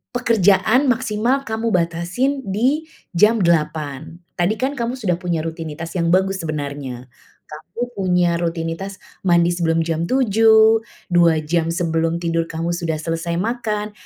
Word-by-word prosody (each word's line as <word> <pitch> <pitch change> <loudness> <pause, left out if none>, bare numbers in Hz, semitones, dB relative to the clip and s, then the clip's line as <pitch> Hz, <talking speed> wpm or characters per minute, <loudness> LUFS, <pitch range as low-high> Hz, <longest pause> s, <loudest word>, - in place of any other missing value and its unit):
pekerjaan 230 +2 +3
maksimal 245 +2 0
kamu 225 +1 -1
batasin 180 +12 -1
di 250 +11 +1 0.3
jam 210 +6 +4
08:00. 155 -2 -1 0.2
Tadi 180 +5 +1
kan 270 +3 -1
kamu 240 -1 -2
sudah 190 -7 0
punya 175 -3 -1
rutinitas 165 +1 -6
yang 170 -2 +1
bagus 190 +1 +2
sebenarnya. 140 -5 -5 0.4
Kamu 155 +8 -10
punya 180 -3 +1
rutinitas 170 +3 -3 0.3
mandi 170 0 +4
sebelum 165 -1 +1
jam 165 0 -1
07:00, 220 -2 +5 0.3
2 170 -2 +5
jam 165 +1 0
sebelum 165 -1 0
tidur 165 0 0
kamu 165 +1 -3
sudah 170 -2 -2
selesai 165 +2 -3
makan, 215 0 -2
175 Hz, 130 wpm, -20 LUFS, 165-220 Hz, 0.4 s, 07:00